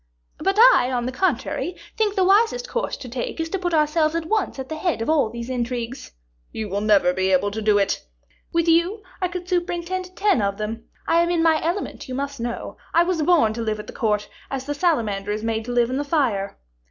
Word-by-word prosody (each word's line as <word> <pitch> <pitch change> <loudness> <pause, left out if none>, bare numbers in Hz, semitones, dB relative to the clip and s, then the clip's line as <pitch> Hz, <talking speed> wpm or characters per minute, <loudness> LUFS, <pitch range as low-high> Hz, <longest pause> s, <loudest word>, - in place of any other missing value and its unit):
"But 390 +1 0
I, 455 - +7
on 245 -1 -1
the 255 - -2
contrary, 310 +2 -1 0.2
think 420 -2 +1
the 380 - +3
wisest 455 +6 +3
course 485 0 -2
to 255 - -9
take 245 +6 -4
is 325 0 -2
to 390 - -2
put 355 -1 -1
ourselves 310 +1 +2
at 335 -1 -1
once 430 -2 0
at 265 -1 -5
the 315 - -5
head 340 -3 -1
of 225 +7 0
all 290 -8 +3
these 235 +1 -6
intrigues." 245 0 -4 0.4
"You 215 -2 -4
will 200 +2 -1
never 205 -4 +4
be 190 +1 0
able 190 +2 +2
to 220 +2 -4
do 210 -1 +3
it." 200 -1 0 0.5
"With 335 0 +1
you, 345 +6 +2 0.2
I 365 - +2
could 360 0 -6
superintend 360 +1 -2
ten 400 - +2
of 200 0 -1
them. 220 +2 -4 0.2
I 335 +1 +4
am 340 - +1
in 340 -2 +2
my 320 -1 +3
element, 340 -4 -3
you 255 - -3
must 280 0 -4
know. 235 0 -4 0.2
I 335 - +6
was 350 -2 0
born 300 -9 +4
to 230 - -4
live 215 -1 -2
at 210 - -7
the - - -10
court, 210 -4 0 0.2
as 270 -1 -4
the 290 - -2
salamander 225 - 0
is 215 +1 -3
made 225 -1 -1
to 245 - -4
live 240 0 +2
in 260 - -1
the 290 - 0
fire." 250 -10 0
280 Hz, 235 wpm, -23 LUFS, 225-345 Hz, 0.5 s, I